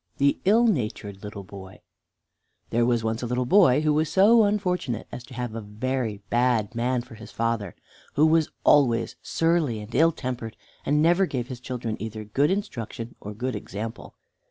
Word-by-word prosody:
II 140 Hz, 0 st, +5 dB
THE -, -, -10 dB
ILL 230 Hz, +3 st, +5 dB
NATURED 105 Hz, -, -2 dB
LITTLE 105 Hz, -1 st, -7 dB
BOY 95 Hz, 0 st, -11 dB, 0.9 s
There 120 Hz, +1 st, +2 dB
was 120 Hz, -2 st, +1 dB
once 110 Hz, 0 st, -1 dB
a 120 Hz, -, -3 dB
little 125 Hz, +1 st, -1 dB
boy 150 Hz, -3 st, +5 dB
who 155 Hz, -1 st, +2 dB
was 155 Hz, 0 st, +1 dB
so 220 Hz, +5 st, +6 dB
unfortunate 180 Hz, -, -1 dB
as 125 Hz, -, -7 dB
to 130 Hz, -, -12 dB
have 120 Hz, -2 st, -4 dB
a 115 Hz, -, -5 dB
very 110 Hz, 0 st, -3 dB
bad 120 Hz, -4 st, +2 dB
man 120 Hz, +1 st, 0 dB
for 120 Hz, 0 st, -14 dB
his 110 Hz, 0 st, -11 dB
father, 115 Hz, -5 st, -2 dB, 0.4 s
who 150 Hz, -, +5 dB
was 160 Hz, -1 st, +3 dB
always 120 Hz, -5 st, +3 dB
surly 165 Hz, -9 st, +1 dB
and 105 Hz, +2 st, -10 dB
ill 165 Hz, +4 st, +5 dB
tempered, 125 Hz, -6 st, -5 dB, 0.3 s
and 150 Hz, +2 st, +3 dB
never 175 Hz, +3 st, +4 dB
gave 125 Hz, -4 st, -4 dB
his 125 Hz, -2 st, -6 dB
children 125 Hz, -3 st, -4 dB
either 110 Hz, 0 st, -5 dB
good 135 Hz, +8 st, +1 dB
instruction 120 Hz, -, -4 dB
or 105 Hz, 0 st, -7 dB
good 125 Hz, +2 st, -3 dB
example. 105 Hz, +2 st, -7 dB
125 Hz, 180 wpm, -25 LUFS, 110-150 Hz, 0.9 s, so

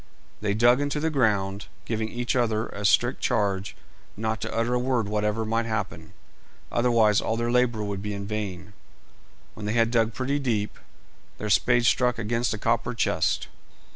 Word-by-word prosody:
They 100 Hz, -1 st, 0 dB
dug 120 Hz, +4 st, +4 dB
into 145 Hz, +1 st, -1 dB
the 160 Hz, +1 st, 0 dB
ground, 105 Hz, -7 st, 0 dB, 0.2 s
giving 110 Hz, -1 st, -2 dB
each 120 Hz, +2 st, -2 dB
other 115 Hz, -3 st, +1 dB
a 100 Hz, +1 st, -6 dB
strict 120 Hz, +6 st, +3 dB
charge 100 Hz, -3 st, 0 dB, 0.4 s
not 110 Hz, 0 st, -2 dB
to -, -, -4 dB
utter 115 Hz, +2 st, 0 dB
a 125 Hz, -, +2 dB
word 125 Hz, -4 st, 0 dB
whatever 105 Hz, +1 st, -1 dB
might 115 Hz, +1 st, 0 dB
happen, 85 Hz, -8 st, -4 dB, 0.6 s
otherwise 115 Hz, -4 st, +3 dB
all 110 Hz, -, -1 dB
their 120 Hz, 0 st, -1 dB
labour 120 Hz, -3 st, +2 dB
would 100 Hz, -1 st, -3 dB
be 105 Hz, 0 st, -4 dB
in 100 Hz, 0 st, -5 dB
vain. 100 Hz, -2 st, -5 dB, 0.8 s
When 105 Hz, -1 st, -7 dB
they 105 Hz, -, 0 dB
had 115 Hz, -1 st, +2 dB
dug 115 Hz, -2 st, +1 dB
pretty 135 Hz, +2 st, -1 dB
deep, 110 Hz, -6 st, -2 dB, 0.6 s
their 105 Hz, 0 st, -3 dB
spades 120 Hz, +3 st, +3 dB
struck 125 Hz, -1 st, +2 dB
against 115 Hz, +2 st, -1 dB
a -, -, -6 dB
copper 115 Hz, +3 st, 0 dB
chest. -, -, 0 dB
110 Hz, 170 wpm, -26 LUFS, 105-120 Hz, 0.8 s, dug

